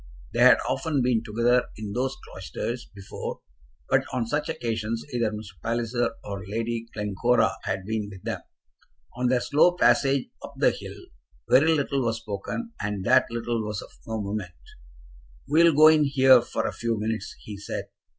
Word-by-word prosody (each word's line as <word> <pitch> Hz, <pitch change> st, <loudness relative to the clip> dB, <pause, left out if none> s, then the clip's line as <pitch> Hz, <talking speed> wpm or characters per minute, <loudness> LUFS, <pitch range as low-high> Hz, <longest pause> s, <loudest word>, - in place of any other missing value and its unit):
They -, -, -2 dB
had -, -, +8 dB
often 145 Hz, -5 st, 0 dB
been 120 Hz, -3 st, +2 dB
together 120 Hz, +3 st, +2 dB
in 105 Hz, -2 st, -5 dB
those 130 Hz, +3 st, -1 dB
cloisters 120 Hz, +5 st, -6 dB
before, 100 Hz, -1 st, -7 dB, 0.5 s
but -, -, +3 dB
on 125 Hz, -2 st, -1 dB
such 150 Hz, +6 st, -2 dB
occasions 115 Hz, -6 st, -3 dB
either 120 Hz, -2 st, +1 dB
Mr. 105 Hz, -6 st, -9 dB
Palliser 120 Hz, +1 st, -1 dB
or 100 Hz, -1 st, -6 dB
Lady 115 Hz, +2 st, -3 dB
Glencora 110 Hz, +1 st, +1 dB
had 95 Hz, -1 st, -2 dB
been 110 Hz, -1 st, -2 dB
with 95 Hz, -2 st, -12 dB
them. -, -, -3 dB, 0.7 s
On 125 Hz, +1 st, 0 dB
their 125 Hz, 0 st, +2 dB
slow 155 Hz, +7 st, +4 dB
passage 140 Hz, -5 st, +3 dB
up -, -, -9 dB
the -, -, +4 dB
hill -, -, -8 dB, 0.5 s
very 155 Hz, +5 st, +5 dB
little 140 Hz, -2 st, 0 dB
was 115 Hz, -1 st, 0 dB
spoken, 115 Hz, -, -5 dB
and 100 Hz, -2 st, -3 dB
that 130 Hz, +2 st, +5 dB
little 115 Hz, -1 st, -2 dB
was 105 Hz, -2 st, -4 dB
of -, -, -14 dB, 0.2 s
no 110 Hz, 0 st, -3 dB
moment. 100 Hz, -4 st, -4 dB, 0.9 s
"We 160 Hz, +3 st, +4 dB
will 165 Hz, -3 st, +5 dB
go 155 Hz, +1 st, +8 dB
in 155 Hz, -1 st, +4 dB
here 130 Hz, -3 st, +6 dB
for -, -, -3 dB
a -, -, -2 dB
few 115 Hz, -2 st, -2 dB
minutes," 110 Hz, -1 st, -3 dB
he 105 Hz, -2 st, -9 dB
said. 100 Hz, -, -5 dB
115 Hz, 170 wpm, -26 LUFS, 105-130 Hz, 0.9 s, had